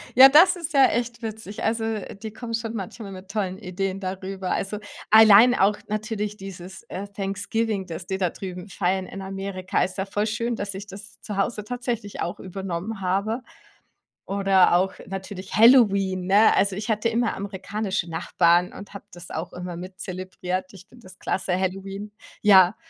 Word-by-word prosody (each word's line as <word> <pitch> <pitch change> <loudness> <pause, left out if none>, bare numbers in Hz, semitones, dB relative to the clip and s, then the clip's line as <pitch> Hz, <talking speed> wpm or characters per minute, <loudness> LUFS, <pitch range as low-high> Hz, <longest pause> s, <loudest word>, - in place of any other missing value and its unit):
Ja, 265 +2 +11
das 340 +7 +7
ist 335 -2 -6
ja 270 -2 +7
echt 235 0 -2
witzig. 220 -2 -6
Also, 225 0 0
äh, 220 -3 -3
die 215 +1 -8
kommen 230 0 -4
schon 225 0 -4
manchmal 200 0 -6
mit 190 0 -10
tollen 195 -3 -2
Ideen 195 +1 -3
da 185 -1 -3
rüber. 190 -1 -4
Also, 205 +2 -2 0.3
allein 220 +2 +8
auch 205 -1 +3
natürlich 210 0 -3
dieses, 190 -1 -9
äh, 195 +2 -5
Thanksgiving, 200 +1 -2
dass 175 +1 -7
die 190 - -2
da 180 -3 0
drüben 185 0 -7
feiern 185 0 0
in 195 - -8
Amerika. 195 -1 -2
Ist 185 +1 -4
ja 190 - 0
voll 205 +2 -1
schön, 230 +2 -1
dass 200 -2 -4
ich 200 +2 -8
das 205 +2 -12
zu 205 -2 -6
Hause 210 +1 -1
tatsächlich 240 -3 -4
auch 175 - -3
übernommen 190 +2 -5
habe. 200 +6 0 0.8
Oder 195 -2 +4
auch 190 +2 +2
natürlich 190 0 -6
Halloween, 200 -6 +5
ne? 205 +3 +6
Also, 195 -1 +2
ich 215 +3 -5
hatte 215 +1 +1
immer 230 0 0
amerikanische 195 -1 -3
Nachbarn 170 +1 +2
und 200 - -11
habe 200 - -9
das 175 0 -11
auch 165 +2 -5
immer 180 -1 -6
mit 185 +2 -9
zelebriert. 185 0 -4
Ich 190 -2 -13
finde 245 -1 -18
das 185 -2 -14
klasse, 185 -1 -1
Halloween. 195 +2 -4 0.3
Ja, 190 -2 +7
195 Hz, 180 wpm, -24 LUFS, 185-215 Hz, 0.8 s, Ja